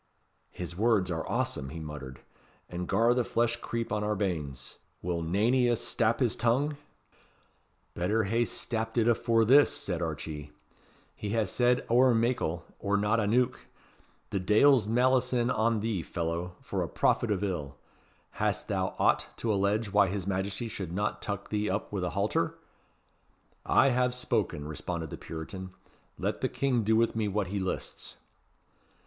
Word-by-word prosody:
"His 90 -1 -7
words 105 -3 +2
are 80 -1 -3
awsome," 65 - -1
he 80 - -7
muttered, 75 -4 -8 0.5
"and 90 0 -5
gar 115 +4 +3
the 125 0 +1
flesh 120 0 0
creep 115 -2 -4
on 105 0 0
our 105 0 0
banes. 75 -10 -4 0.2
Will 85 -1 -1
nane 100 +9 +1
o' - - +4
ye 120 -2 +3
stap 115 0 0
his 120 -2 +2
tongue?" 135 +6 +1 1.2
"Better 105 +6 +1
hae 115 +4 +1
stapt 115 0 -3
it 115 -1 +3
afore 115 -1 +3
this," 140 +5 +6
said 90 -3 -3
Archee; 75 -2 -4 0.7
"he 105 - -5
has 105 -4 +1
said 125 0 +2
ower 125 +1 +5
meikle, 115 -8 0
or 100 0 +1
not 105 +3 +2
aneuch, 115 +4 +2 0.7
The 100 - 0
Deil's 110 +5 +5
malison 125 +1 +2
on 110 -1 +1
thee, 110 -5 -1
fellow, 85 +3 -3
for - - -3
a - - -2
prophet 120 - +1
of 105 -1 0
ill! 75 -8 -3 0.5
Hast - - -1
thou - - -1
aught - - +2
to 115 -2 0
allege 100 +1 0
why 100 -1 +5
his 95 -1 -3
Majesty 95 +3 -2
should 95 -6 -5
not 105 +4 -2
tuck 100 -1 -4
thee 105 0 -1
up 100 +3 -2
with 95 -3 -1
a 90 - 0
halter?" 100 -4 0 1.1
"I 135 - +5
have 125 0 +1
spoken," 75 -11 -1
responded 80 0 -4
the - - -5
Puritan; 95 +3 -7 0.4
"let - - -2
the - - +1
King 130 -4 0
do 110 +2 +3
with 115 0 +2
me 110 -2 0
what 100 -1 -1
he 100 +1 -2
lists." 95 -1 -4
105 Hz, 165 wpm, -29 LUFS, 90-115 Hz, 1.2 s, this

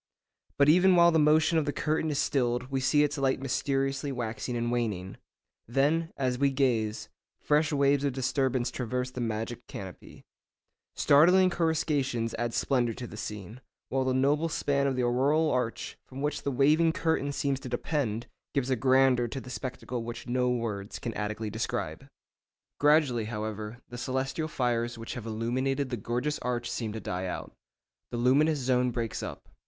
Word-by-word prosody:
But 140 - +5
even 180 +4 +6
while 170 0 +6
the 160 - +3
motion 155 +2 +4
of 155 - -1
the 145 - 0
curtain 155 +2 -1
is 145 - -1
stilled 125 -1 0
we 135 - 0
see 145 +3 +4
its 150 0 -1
light 135 -1 +1
mysteriously 135 +1 -1
waxing 120 0 -3
and 120 0 -1
waning. 105 -6 -2 0.5
Then, 150 +7 +1
as 125 -2 -1
we 140 0 +4
gaze, 120 -6 0 0.3
fresh 150 +1 +2
waves 140 -1 +3
of 140 - +1
disturbance 130 -1 0
traverse 125 +1 -3
the 125 - -5
magic 115 +1 -3
canopy. 95 -2 -9 0.7
Startling 180 +6 +5
coruscations 145 -8 0
add 120 -1 -2
splendour 120 -4 +1
to 125 - -6
the 110 - -9
scene, 105 +2 -7 0.3
while 135 0 +1
the 130 0 0
noble 145 +5 +2
span 140 -2 0
of 135 - 0
the 125 - 0
auroral 140 +6 +2
arch, 125 -2 -2
from 135 +2 -7
which 145 0 -1
the 140 - -2
waving 155 +5 +4
curtain 160 -4 0
seems 140 -1 -1
to 130 - -8
depend, 120 -3 -2 0.3
gives 135 -1 0
a - - +4
grandeur 130 0 +3
to 135 - -5
the 125 -1 -10
spectacle 125 -2 -5
which 120 +1 -7
no 125 0 +1
words 110 -4 -3
can 115 - -4
adequately 105 +1 -3
describe. 110 +2 -3 0.7
Gradually, 145 -6 +3
however, 110 +1 -5
the 120 - -7
celestial 135 +5 -2
fires 120 -4 -1
which 115 0 -6
have 115 -2 -7
illuminated 130 +5 -1
the - - 0
gorgeous 125 +8 -2
arch 120 -1 -2
seem 110 -3 -3
to 110 - -4
die 95 -2 -3
out. - - -5 0.6
The 120 - -4
luminous 145 +6 +3
zone 125 -1 +1
breaks 115 -2 -3
up. - - -7
130 Hz, 170 wpm, -29 LUFS, 120-145 Hz, 0.7 s, even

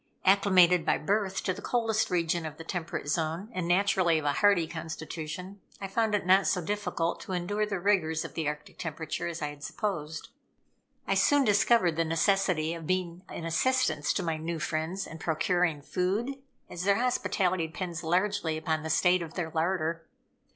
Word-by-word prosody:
Acclimated 185 -3 +5
by - - +2
birth 195 +2 -1
to 185 - 0
the 195 - -9
coldest 225 -3 0
region 170 -1 0
of 155 -1 -6
the 165 - -8
temperate 165 -3 -4
zone, 160 +6 -1
and 180 -4 -2
naturally 180 -2 +3
of 155 - -3
a 145 - +2
hardy 200 -1 +4
constitution, 165 +3 -6 0.2
I 195 - -4
found 220 +2 +1
it 205 - -1
not 190 +1 +5
so 190 -1 +2
difficult 180 -2 -2
to 190 - -6
endure 205 +4 -1
the 200 -3 -2
rigors 175 -5 +1
of - - -8
the 160 -3 -2
Arctic 150 0 -6
temperature 160 0 -4
as 170 -2 -4
I 150 - -1
had 145 0 -11
supposed. 160 -7 -4 0.8
I - - +1
soon 290 -1 +4
discovered 205 -5 +3
the 165 - +3
necessity 165 -1 +1
of 165 -2 -7
being 180 -1 -1
an 165 - -6
assistance 210 - +1
to 190 - -1
my 165 -2 -1
new 165 +2 -3
friends 160 +5 -2
in 165 - -9
procuring 165 -1 0
food, 215 - -1 0.3
as 175 - -6
their 200 +1 +4
hospitality 185 -8 0
depends 170 0 -5
largely 180 -1 0
upon 160 0 -1
the 160 - -5
state 180 +3 +3
of 165 -2 -7
their 170 -3 -3
larder. 165 -1 -1
175 Hz, 180 wpm, -29 LUFS, 160-195 Hz, 0.8 s, Acclimated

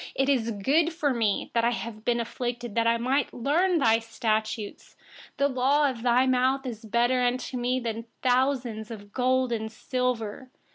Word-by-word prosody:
71It 270 +1 +2
is 240 -5 +2
good 320 - +3
for 295 -4 0
me 220 -4 0
that 230 - +2
I 235 - +4
have 230 -2 -5
been 240 0 +1
afflicted, 240 0 -4
that 230 +1 +1
I 230 0 +3
may 260 +3 +1
learn 335 +9 +1
your 225 -4 +3
statutes. 220 -1 -3 0.4
72The 280 -2 +1
law 280 +3 +3
of 235 -3 -9
your 245 +1 +3
mouth 260 +1 +2
is 230 -3 -6
better 245 +2 +2
to 255 0 -6
me 250 +1 0
than 230 -1 -4 0.2
thousands 250 -4 +1
of 225 - -6
pieces 205 - -14
of - - -38
gold 255 0 +1
and 220 -1 -2
silver. 250 0 -3
245 Hz, 185 wpm, -27 LUFS, 230-260 Hz, 0.4 s, I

